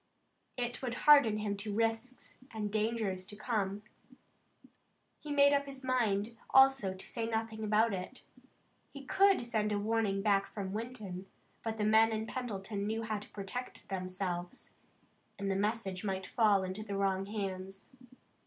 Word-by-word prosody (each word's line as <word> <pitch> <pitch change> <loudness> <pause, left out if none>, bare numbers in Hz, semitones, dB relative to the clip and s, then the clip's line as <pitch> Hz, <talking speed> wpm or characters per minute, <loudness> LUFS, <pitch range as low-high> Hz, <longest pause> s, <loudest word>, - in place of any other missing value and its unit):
It 245 -1 -3
would 250 -2 -3
harden 280 -8 +7
him 210 -1 -2
to 205 +1 -4
risks 225 +3 -2
and 210 -2 -4
dangers 215 -3 -1
to 205 - -7
come. 205 -2 -2 1.4
He 300 - -7
made 285 0 +6
up 280 0 +1
his 270 -1 -9
mind, 230 -4 +1
also, 265 -8 +5
to 190 - -7
say 230 -1 -3
nothing 220 -1 -2
about 215 +1 +3
it. 185 +7 -6 0.7
He 280 -1 -10
could 390 -4 +4
send 215 -3 0
a 205 - +1
warning 205 -2 0
back 200 -2 +3
from 195 -2 -5
Winton, 210 -5 -6 0.4
but 225 -1 -3
the 210 - -1
men 220 +1 +5
in 220 0 -2
Pendleton 205 -4 -4
knew 225 +1 -1
how 215 -1 -2
to 210 - -12
protect 210 +5 -7
themselves, 185 -1 -4 0.6
and 195 0 -2
the - - 0
message 200 -2 -1
might 190 -2 -2
fall 210 -3 +3
into 185 +3 -4
wrong 195 -1 0
hands. 195 -2 -5
215 Hz, 155 wpm, -33 LUFS, 195-230 Hz, 1.4 s, harden